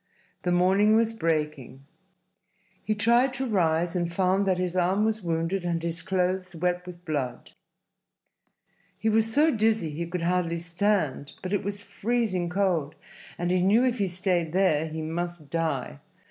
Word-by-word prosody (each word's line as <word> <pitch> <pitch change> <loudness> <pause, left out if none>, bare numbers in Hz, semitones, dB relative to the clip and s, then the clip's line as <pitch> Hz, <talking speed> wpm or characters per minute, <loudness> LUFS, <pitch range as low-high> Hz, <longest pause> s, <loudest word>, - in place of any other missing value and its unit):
The 180 - -1
morning 190 +4 +4
was 225 0 +2
breaking. 150 - -2 1.0
He 215 +2 0
tried 240 +5 +3
to 265 0 -2
rise 175 -5 +1
and 170 -1 -1
found 190 +2 +1
that 185 -2 +2
his 180 -1 -2
arm 185 +4 +2
was 220 0 0
wounded 170 +2 -1
and 170 -1 -2
his 170 0 -1
clothes 185 -1 -1
wet 180 +2 -1
with 175 0 -10
blood. 145 -6 -3 1.5
He 220 - 0
was 220 +1 +2
so 300 +2 +3
dizzy 220 -6 +1
he 170 +3 -4
could 175 0 -4
hardly 170 -1 0
stand, 170 -5 0
but 185 +2 -3
it 200 - 0
was 200 +1 -4
freezing 200 -3 -1
cold, 180 -6 0 0.4
and 175 0 -1
he 185 0 +2
knew 210 +7 +4
if 250 -2 0
he 200 - +1
stayed 180 -2 -1
there 170 -5 +2
he 160 0 -5
must 170 -1 -5
die. 155 - -2
180 Hz, 160 wpm, -26 LUFS, 165-205 Hz, 1.5 s, morning